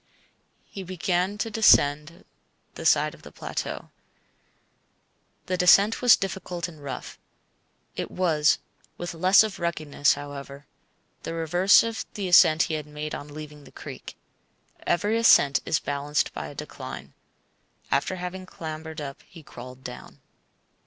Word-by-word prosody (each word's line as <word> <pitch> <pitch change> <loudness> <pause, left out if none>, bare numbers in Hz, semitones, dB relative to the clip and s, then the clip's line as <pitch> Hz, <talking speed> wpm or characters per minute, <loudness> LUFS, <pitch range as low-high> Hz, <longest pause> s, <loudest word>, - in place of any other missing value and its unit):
He 195 - -9
began 185 +2 -1
to 225 +1 -3
descend 150 -7 +3 0.5
the - - -2
side - - +3
of - - -16
the - - -13
plateau. - - -5 1.5
The 185 - -2
descent 200 +5 +5
was 245 -2 +7
difficult 185 -3 -4
and 160 -4 -13
rough. 140 -1 -7 0.8
It - - -4
was 155 -5 +2 0.4
(with 175 0 -5
less 185 +5 +5
of 215 -2 -5
ruggedness, 155 -4 +1
however) 145 0 -8 0.6
the 165 - -5
reverse 175 +4 +4
of 230 -1 -3
the 200 -3 -3
ascent 165 -3 +6
he 160 - -3
had 150 -1 -4
made 150 +1 -6
on 145 - -6
leaving 150 -1 -10
the - - -16
creek. - - -10 0.7
Every 205 +6 +1
ascent 145 -11 +5
is 160 - +2
balanced 145 +1 -1
by 75 -1 -5
a - - -11
decline. - - -8 0.8
After 185 - +1
having 185 +1 -6
clambered 160 -2 -7
up 140 -1 -7
he 165 -4 -14
crawled 125 0 -11
down. 125 - -10
165 Hz, 140 wpm, -25 LUFS, 145-185 Hz, 1.5 s, was